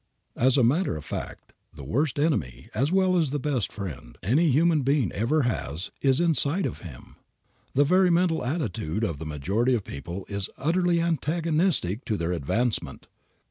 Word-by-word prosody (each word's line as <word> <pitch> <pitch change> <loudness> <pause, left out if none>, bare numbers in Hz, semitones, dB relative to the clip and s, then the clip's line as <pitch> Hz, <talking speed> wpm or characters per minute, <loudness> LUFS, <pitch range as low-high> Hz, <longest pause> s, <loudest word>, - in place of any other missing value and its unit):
As 130 +3 +3
a 130 - +4
matter 135 - +2
of 75 - -9
fact - - -7 0.2
the 70 - -9
worst 135 - 0
enemy, 145 - -1
as 140 +5 0
well 185 -1 +3
as 160 -5 +2
the 145 - -1
best 135 -6 -1
friend, 65 - -7
any 150 - +3
human 155 +3 +3
being 135 - +1
ever 135 +8 +1
has 90 - -3
is 135 -1 +3
inside 165 +1 +2
of - - -4
him. 75 -9 -12 0.6
The 140 - +5
very 180 +5 +4
mental 170 -1 +2
attitude 115 - -2
of 80 -8 -2
the 80 - -6
majority 100 - 0
of 110 - -2
people 85 +7 -7
is 100 -1 -3
utterly 175 +2 +1
antagonistic 160 - 0
to 110 - -1
their 85 0 -1
advancement. 105 - -2
130 Hz, 170 wpm, -26 LUFS, -, 0.6 s, The